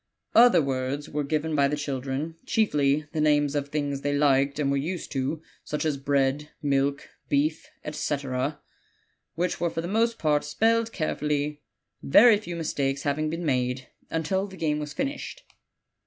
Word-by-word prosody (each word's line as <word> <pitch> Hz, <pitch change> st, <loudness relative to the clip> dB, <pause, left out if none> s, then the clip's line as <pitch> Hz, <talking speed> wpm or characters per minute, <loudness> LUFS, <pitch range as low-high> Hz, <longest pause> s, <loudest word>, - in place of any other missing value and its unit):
Other 230 Hz, -8 st, +7 dB
words 135 Hz, +1 st, -2 dB
were 150 Hz, 0 st, -2 dB
given 155 Hz, +2 st, -1 dB
by 140 Hz, -2 st, +4 dB
the 145 Hz, -, -1 dB
children, 140 Hz, +2 st, -3 dB
chiefly 150 Hz, -8 st, +2 dB
the 155 Hz, -, 0 dB
names 145 Hz, -1 st, +3 dB
of 145 Hz, -1 st, -2 dB
things 145 Hz, -2 st, -2 dB
they 145 Hz, 0 st, 0 dB
liked 140 Hz, -1 st, +3 dB
and 140 Hz, -2 st, +1 dB
were 140 Hz, -, +1 dB
used 170 Hz, +5 st, -4 dB
to, 140 Hz, +4 st, -2 dB, 0.2 s
such 150 Hz, +1 st, -3 dB
as 155 Hz, -2 st, +1 dB
bread, 140 Hz, +1 st, 0 dB
milk, 140 Hz, -1 st, 0 dB, 0.2 s
beef, 150 Hz, +2 st, +1 dB, 0.2 s
etc., 140 Hz, -1 st, -2 dB, 0.8 s
which 175 Hz, +1 st, -1 dB
were 170 Hz, -, +2 dB
for 165 Hz, -, -3 dB
the 170 Hz, -, -5 dB
most 230 Hz, +4 st, +1 dB
part 150 Hz, -2 st, +1 dB
spelled 225 Hz, +9 st, +1 dB
carefully, 150 Hz, -3 st, -2 dB, 0.4 s
very 215 Hz, -, +7 dB
few 175 Hz, -5 st, -6 dB
mistakes 140 Hz, -4 st, -1 dB
having 155 Hz, +2 st, 0 dB
been 165 Hz, +2 st, -4 dB
made, 125 Hz, -2 st, -1 dB, 0.2 s
until 190 Hz, +5 st, -1 dB
the 190 Hz, -1 st, -12 dB
game 150 Hz, -3 st, 0 dB
was 150 Hz, -1 st, -5 dB
finished. 280 Hz, -, -4 dB
150 Hz, 160 wpm, -26 LUFS, 140-165 Hz, 0.8 s, Other